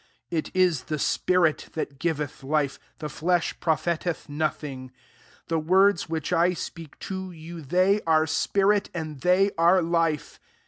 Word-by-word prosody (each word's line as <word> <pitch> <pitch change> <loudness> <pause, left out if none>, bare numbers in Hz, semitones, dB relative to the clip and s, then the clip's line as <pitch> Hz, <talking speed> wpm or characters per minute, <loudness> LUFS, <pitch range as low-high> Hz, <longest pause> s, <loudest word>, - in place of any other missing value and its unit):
6S 170 - -1
It - - -6
is 180 -7 +3
the 155 - -2
spirit 170 +2 +1
ths^ 150 -3 -3
g^eth 150 -4 -2
life; 145 0 0 0.2
the 155 - -7
fiesli 170 +4 -1
profiteth 170 +1 -1
nothing: 145 -3 -3 0.6
the 165 -1 0
words 185 +2 +3
which 160 -2 -2
I 175 +2 +3
speak 165 -3 -8
to 190 -1 -5
you, 165 0 -9
they 185 +8 +2
are 160 -1 +4
spirit, 195 +5 +1
and 155 -4 -5
they 190 +3 +3
are 175 +3 +5
life. 165 -3 0
165 Hz, 145 wpm, -26 LUFS, 155-180 Hz, 0.6 s, are